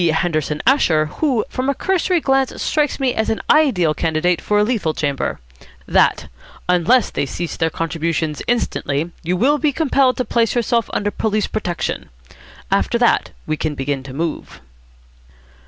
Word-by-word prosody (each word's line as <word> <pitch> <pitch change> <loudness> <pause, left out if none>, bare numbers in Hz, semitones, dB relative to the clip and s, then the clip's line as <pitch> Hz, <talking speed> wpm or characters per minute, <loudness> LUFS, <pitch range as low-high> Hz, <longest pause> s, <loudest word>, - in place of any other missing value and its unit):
Henderson 155 -2 0
Asher, 170 - +3
who 250 - -1
from 260 0 -2
a 280 - +1
cursory 370 +2 +1
glance 270 -2 +1
strikes 300 -1 0
me 260 -2 +1
as 220 - -1
an 220 - 0
ideal 215 - +3
candidate 165 +2 0
for 210 - 0
a 210 - +4
lethal 210 -9 -1
chamber) 140 -3 -2 0.5
that, - - +2 0.4
unless 180 +7 +3
they 140 - -2
cease 170 +5 -4
their 165 -1 0
contributions 165 -2 -2
instantly, 165 -9 -1
you 180 +2 -1
will 285 +9 +3
be 300 0 +2
compelled 275 -4 +2
to 255 - -1
place 230 -1 +1
yourself 235 -1 +1
under 205 0 -1
police 215 -1 0
protection. 180 -5 -3 0.6
After - - +2
that - - +2 0.2
we 155 - -1
can 155 -1 -2
begin 135 0 -2
to 135 0 -10
move." 160 +3 -4
200 Hz, 155 wpm, -19 LUFS, 160-255 Hz, 0.6 s, a